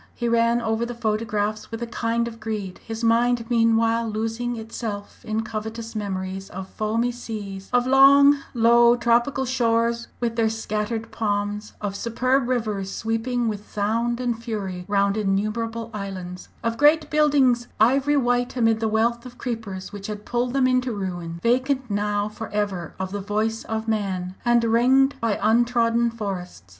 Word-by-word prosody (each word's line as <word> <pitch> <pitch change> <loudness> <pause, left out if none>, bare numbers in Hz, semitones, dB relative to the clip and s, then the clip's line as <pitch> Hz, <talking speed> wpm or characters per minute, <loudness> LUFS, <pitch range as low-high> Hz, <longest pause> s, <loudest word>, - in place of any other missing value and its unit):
He 240 - -2
ran 235 0 +3
over 225 0 0
the 240 0 -4
photographs 215 -1 -1
with 225 +1 -5
a - - -1
kind 235 0 -1
of 230 -1 -8
greed, 210 -4 -4
his 225 0 -7
mind 235 +1 +3
meanwhile 230 0 +3
losing 225 +3 -2
itself 220 -2 -6
in 220 0 -2
covetous 220 +1 -6
memories 190 -2 -4
of 190 0 -7
foamy 225 +3 -1
seas, 205 -5 -7
of 245 0 +3
long, 280 +2 +7 0.2
low, 235 +1 +6
tropical 240 +3 +2
shores 235 -2 +1
with 235 -1 -1
their 225 -1 +3
scattered 220 0 -3
palms, 205 -1 -2
of 200 -2 -3
superb 250 +4 0
rivers 210 -6 -1
sweeping 230 +3 -1
with 210 -1 -4
sound 230 +4 0
and 240 -2 -2
fury 195 -6 -4
round 200 0 +2
innumerable 220 +3 -1
islands, 185 -3 -6
of 230 0 -1
great 300 +1 +4
buildings 280 -5 +3
ivory 270 +6 +4
white 245 -1 +1
amid 225 -2 +3
the 225 - 0
wealth 230 +2 +1
of 245 -1 -11
creepers 215 -6 -5
which 205 -1 -7
had 210 -1 -6
pulled 245 +1 -1
them 270 -1 +3
into 255 0 +2
ruin, 175 -5 -4
vacant 255 +1 +1
now 205 0 0
for 215 +1 -7
ever 200 -5 -3
of 190 0 -3
the 205 0 -3
voice 215 +3 -1
of 220 0 -3
man, 190 -4 -1
and 240 -1 +3
ringed 255 +4 +4
by 225 -3 +1
untrodden 235 +1 +3
forests. 195 - -5
225 Hz, 160 wpm, -24 LUFS, 210-240 Hz, 0.2 s, long